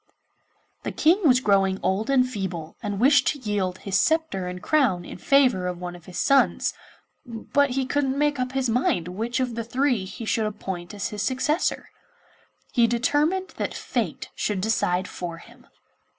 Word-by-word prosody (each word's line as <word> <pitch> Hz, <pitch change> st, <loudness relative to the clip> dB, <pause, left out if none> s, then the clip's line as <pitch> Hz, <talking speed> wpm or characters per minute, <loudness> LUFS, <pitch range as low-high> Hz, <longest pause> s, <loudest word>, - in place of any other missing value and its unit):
The -, -, -4 dB
King 340 Hz, +3 st, +3 dB
was 250 Hz, -2 st, +5 dB
growing 195 Hz, -3 st, +2 dB
old 200 Hz, +5 st, 0 dB
and 255 Hz, -2 st, +4 dB
feeble, 185 Hz, -9 st, -5 dB
and 205 Hz, -3 st, -3 dB
wished 275 Hz, +2 st, +5 dB
to 290 Hz, -, 0 dB
yield 200 Hz, -6 st, -2 dB
his 195 Hz, 0 st, 0 dB
sceptre 315 Hz, -, +1 dB
and 180 Hz, 0 st, -5 dB
crown 215 Hz, -, +1 dB
in -, -, -9 dB
favour 255 Hz, -10 st, +3 dB
of 180 Hz, -1 st, -3 dB
one 175 Hz, 0 st, -6 dB
of 175 Hz, -2 st, -14 dB
his 180 Hz, -, -9 dB
sons, 275 Hz, 0 st, +3 dB, 0.5 s
but 280 Hz, +3 st, 0 dB
he 260 Hz, +1 st, -1 dB
couldn't 270 Hz, 0 st, 0 dB
make 290 Hz, -1 st, +1 dB
up 255 Hz, 0 st, -2 dB
his 265 Hz, -1 st, 0 dB
mind 225 Hz, -7 st, +1 dB
which 225 Hz, +7 st, -2 dB
of 255 Hz, -2 st, -1 dB
the 230 Hz, 0 st, -3 dB
three 245 Hz, -3 st, 0 dB
he 220 Hz, +4 st, -7 dB
should 220 Hz, 0 st, +1 dB
appoint 190 Hz, -3 st, -6 dB
as 200 Hz, -, -3 dB
his 210 Hz, -2 st, -5 dB
successor. 270 Hz, -, 0 dB, 0.8 s
He 235 Hz, -3 st, +4 dB
determined 295 Hz, +10 st, +1 dB
that -, -, -3 dB
fate -, -, -3 dB
should 205 Hz, -3 st, -1 dB
decide 185 Hz, -3 st, 0 dB
for 170 Hz, -2 st, -6 dB
him. -, -, -17 dB
230 Hz, 175 wpm, -25 LUFS, 190-270 Hz, 0.8 s, was